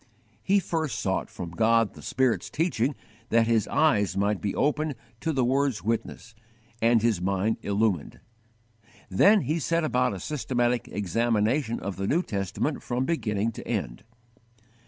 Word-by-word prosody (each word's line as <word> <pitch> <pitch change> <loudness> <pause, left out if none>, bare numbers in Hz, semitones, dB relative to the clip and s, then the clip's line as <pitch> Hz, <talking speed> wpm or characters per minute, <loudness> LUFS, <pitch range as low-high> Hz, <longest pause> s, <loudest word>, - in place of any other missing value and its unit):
He 200 - +3
first 160 - -2
sought 95 -4 -1
from 85 -2 -7
God 115 +3 +2
the - - -12
Spirit's 130 -3 0
teaching 145 -4 0 0.3
that 115 0 +4
his 115 -2 +2
eyes 110 -12 +2
might 100 0 +1
be 100 - -2
opened 150 0 0 0.2
to 160 - -1
the 130 -5 +1
Word's 135 -2 +1
witness, 115 +1 -3 0.5
and 115 -1 +4
his 110 -7 +2
mind 95 +4 0
illumined; 100 -5 -1 0.9
then 200 - +5
he 160 +1 -1
set 165 +2 0
about 125 -6 +1
a - - -6
systematic 120 - -1
examination 115 - 0
of 100 0 -5
the 95 0 -2
New 170 - +2
Testament 100 - -2
from 125 +1 -2
beginning 115 -9 -1
to - - -10
end. - - -3
115 Hz, 150 wpm, -26 LUFS, 105-140 Hz, 0.9 s, then